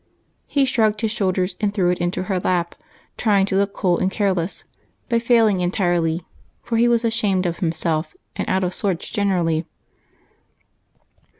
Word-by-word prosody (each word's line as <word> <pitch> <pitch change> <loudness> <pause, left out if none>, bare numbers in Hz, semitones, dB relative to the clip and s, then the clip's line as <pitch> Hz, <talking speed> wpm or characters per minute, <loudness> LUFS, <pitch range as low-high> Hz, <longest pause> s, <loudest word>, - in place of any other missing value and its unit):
He 280 -2 +2
shrugged 220 -4 +1
his 220 -2 0
shoulders, 185 -3 0
and 205 -1 +1
threw 185 -4 +1
it 180 - -2
into 175 +1 -1
her 190 -1 -1
lap, 175 -1 0 0.4
trying 200 -4 +3
to 195 - -2
look 200 +1 +2
cool 175 -2 +1
and 185 - +1
careless, 190 -3 -1 0.5
but 235 -1 +2
failing 230 -5 +3
entirely, 175 -2 0 0.4
for 235 -1 -1
he 235 +1 +4
was 235 0 +2
ashamed 210 -5 +1
of 170 -1 -1
himself, 165 - -1 0.2
and - - -3
out 190 0 +1
of 180 0 -1
sorts 185 -4 -2
generally. 175 -6 0
190 Hz, 160 wpm, -21 LUFS, 175-215 Hz, 0.5 s, he